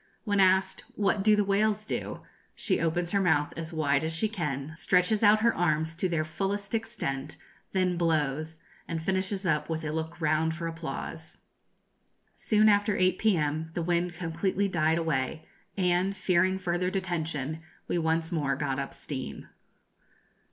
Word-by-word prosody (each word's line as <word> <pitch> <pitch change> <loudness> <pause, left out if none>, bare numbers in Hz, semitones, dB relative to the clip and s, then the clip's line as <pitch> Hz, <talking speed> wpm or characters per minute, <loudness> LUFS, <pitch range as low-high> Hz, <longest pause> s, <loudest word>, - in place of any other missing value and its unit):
When 205 -2 0
asked, 190 0 +3
'What 200 -1 +1
do 215 0 +6
the 210 - +2
whales 210 +2 +1
do?' - - -4 0.3
she - - 0
opens 170 +1 0
her 200 - +2
mouth 160 -5 +2
as 165 0 -5
wide 145 -3 +1
as 160 0 -1
she 195 +7 +2
can, 150 -8 -3
stretches 180 +5 +2
out 215 0 +6
her 230 0 +4
arms 160 -1 +1
to 185 - 0
their 160 -2 0
fullest 200 +6 -3
extent, 160 -12 -3 0.4
then 185 -2 +1
blows, 155 -1 0 0.3
and 165 - -2
finishes 190 +3 -1
up 150 -3 +1
with 160 0 -3
a 155 - -2
look 160 +1 -4
round 160 0 +1
for 170 0 -5
applause. 165 0 -6 1.0
Soon 215 0 +3
after 205 0 +3
8 185 0 +2
p.m. 160 -6 +1
the 170 - -1
wind 175 +1 0
completely 180 +4 -1
died 160 -3 +2
away, 160 -2 -1 0.3
and, 185 +1 +1
fearing 185 0 +2
further 180 -1 -1
detention, 160 -5 -3 0.3
we 175 - 0
once 165 +1 0
more 145 -5 0
got 140 -1 -2
up 140 - -5
steam. 130 -3 -6
170 Hz, 160 wpm, -28 LUFS, 160-190 Hz, 1.0 s, do